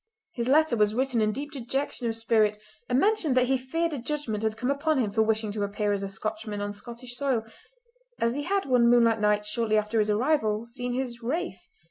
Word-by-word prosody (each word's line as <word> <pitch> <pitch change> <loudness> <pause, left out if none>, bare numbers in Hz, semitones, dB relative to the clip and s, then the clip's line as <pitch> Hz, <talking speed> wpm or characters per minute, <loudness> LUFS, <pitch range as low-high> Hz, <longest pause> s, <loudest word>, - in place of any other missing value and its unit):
His 235 -1 -2
letter 300 -1 +4
was 210 -1 +2
written 255 -2 +1
in 215 0 +2
deep 285 +6 -5
dejection 265 -1 -3
of 225 0 -2
spirit, 220 -2 +2 0.3
and 250 - +2
mentioned 335 -6 +2
that 250 - +5
he 265 +1 +2
feared 325 +6 -1
a 285 - -3
judgment 240 -5 -3
had 220 0 -1
come 250 +3 0
upon 300 +2 +1
him 225 -6 0
for 220 - +2
wishing 220 -1 +1
to 205 0 -4
appear 205 +1 -1
as 200 - -2
a 195 - -4
Scotchman 215 +1 -4
on 205 0 -3
Scottish 240 +4 -8
soil, 260 -4 0 0.8
as 230 0 +1
he 290 - -2
had 390 +5 0
one 245 -3 +4
moonlight 230 -2 +4
night 210 0 +2
shortly 215 0 0
after 215 +1 0
his 215 0 +2
arrival 220 -2 +1
seen 245 +1 -4
his 250 -2 -3
"wraith". 235 - -4
235 Hz, 215 wpm, -27 LUFS, 215-265 Hz, 0.8 s, that